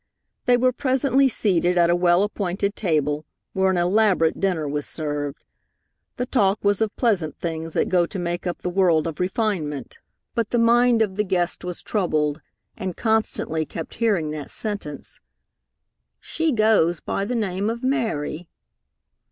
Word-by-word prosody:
They 245 -1 +5
were 255 +1 +3
presently 265 +1 +2
seated 180 -7 +2
at 170 0 +4
a - - +4
well 175 +1 +3
appointed 200 -1 -2
table, 150 -5 0 0.3
where 190 0 +2
an 190 - +1
elaborate 180 -2 +2
dinner 180 -6 0
was 145 0 -2
served. 145 -2 -3 0.7
The 250 - -1
talk 205 -6 +2
was 205 +1 +2
of 220 -1 0
pleasant 190 - 0
things 165 -1 -4
that - - +2
go 175 -2 +2
to 195 - -7
make 175 0 -3
up 175 - -4
the 180 - -1
world 175 -4 +3
of 165 -3 -5
refinement; 180 - -2 0.3
but 230 -3 -1
the 240 - 0
mind 235 0 +4
of 195 -2 -4
the 210 - +2
guest 180 -4 -1
was 180 -1 -5
troubled, 155 -7 0 0.3
and 185 -2 -5
constantly 220 -8 0
kept 160 +1 -7
hearing 200 -10 0
that 150 -2 -6
sentence, 205 -10 -5 1.0
"She 325 -1 -1
goes 215 - +3
by - - -3
the 240 +5 -2
name 200 -2 -1
of 235 +2 -4
Mary." 175 - -2
185 Hz, 160 wpm, -23 LUFS, 165-220 Hz, 1.0 s, They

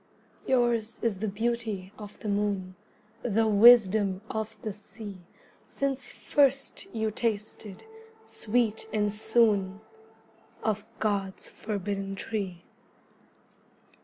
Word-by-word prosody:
Your's 240 -3 +2
is 220 -5 0
the 220 - -1
beauty 215 -2 -2
of 210 -1 -9
the - - -5
moon, 200 -2 -1 0.5
The 225 -1 +2
wisdom 210 -3 +6
of 220 0 -4
the 215 - -3
sea, 205 -1 -10 0.4
Since 270 -2 -3
first 275 -1 +1
you 220 -1 -1
tasted, 215 -2 -3 0.4
sweet 220 -1 0
and 210 -1 +1
soon, 210 -3 +3 0.8
Of 215 -1 -1
God's 200 -3 -2
forbidden 200 -2 -3
tree. 190 -4 -4
215 Hz, 100 wpm, -28 LUFS, 200-225 Hz, 0.8 s, wisdom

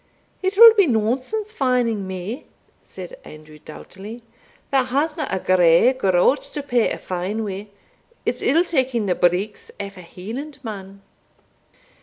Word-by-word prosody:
"It 380 +1 -1
will 460 0 +11
be 400 -5 +4
nonsense 260 - -1
fining 245 - 0
me," 190 +8 -6 0.3
said - - -10
Andrew, 155 0 -13
doughtily, 200 +9 -11 0.5
"that 265 -2 +2
hasna 300 +3 -1
a - - -1
grey 180 +6 +4
groat 195 +2 +2
to 290 - -7
pay 245 -4 +1
a - - -3
fine 185 +5 -3
wi' 200 0 -5 0.6
it's - - -1
ill 330 +5 +3
taking 260 -9 0
the 185 - +1
breeks 180 +4 0
aff 200 -1 -6
a - - -9
Hielandman." 205 - -8
225 Hz, 135 wpm, -21 LUFS, 190-275 Hz, 0.6 s, will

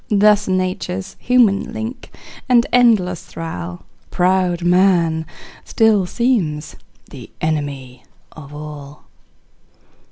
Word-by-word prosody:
Thus 210 0 +4
nature's 185 0 -2
human 230 -4 +2
link 230 +2 -6 0.4
and 240 -2 +5
endless 215 -8 +3
thrall, 90 - -7 0.3
Proud 180 -1 +1
man, 175 -3 +2 0.4
still 215 -4 +2
seems 175 - -1 0.4
the - - -11
enemy 145 -5 -4 0.3
of 145 -2 -12
all. 150 -1 -10
180 Hz, 90 wpm, -18 LUFS, 155-210 Hz, 0.4 s, and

